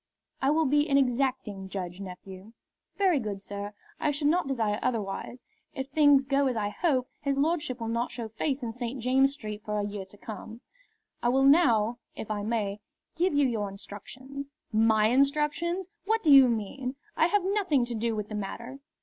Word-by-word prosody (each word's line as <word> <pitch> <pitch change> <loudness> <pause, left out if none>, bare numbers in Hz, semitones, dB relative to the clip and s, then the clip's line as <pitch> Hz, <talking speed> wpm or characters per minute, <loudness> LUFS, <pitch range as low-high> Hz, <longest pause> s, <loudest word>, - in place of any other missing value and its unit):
"I 270 - +3
will 315 +2 +3
be 295 +2 +2
an 275 - +4
exacting 250 -7 0
judge, 180 -2 -5
nephew." 190 +2 -9 0.4
"Very 370 -7 +3
good, 210 -4 -4
sir; 200 +1 -6 0.3
I - - +1
should 290 0 +1
not 345 -1 +2
desire 220 -6 0
otherwise. 230 +1 -3 0.3
If 270 -1 -4
things 285 -1 +5
go 275 0 +2
as 250 -3 -1
I 205 -1 0
hope, 260 0 0
his 280 -1 0
lordship 295 -4 0
will 230 - -3
not 235 +2 -1
show 235 -2 -5
face 265 +5 -2
in 230 - -2
St. 245 +2 -5
James's 265 +3 +3
Street 215 -6 -6
for 210 -1 -2
a 205 - -1
year 205 -1 -5
to 195 +2 -15
come. 220 +2 -8 0.6
I 240 - +2
will 265 +2 +3
now, 245 -7 +4 0.2
if 215 - -6
I 210 -1 -1
may, 210 -2 -1 0.4
give 350 -1 +1
you 285 -1 +4
your 215 -4 -1
instructions." 260 +8 -9 0.2
"My 220 0 +4
instructions! 300 - +1 0.2
What 445 +2 +1
do 310 - +5
you 270 -2 +9
mean? 250 +4 -3 0.2
I 320 - +4
have 405 +1 +2
nothing 375 - +2
to 240 - -5
do 225 0 -1
with 210 -1 -3
the 215 - -8
matter." 235 +6 -5
250 Hz, 190 wpm, -28 LUFS, 215-280 Hz, 0.6 s, you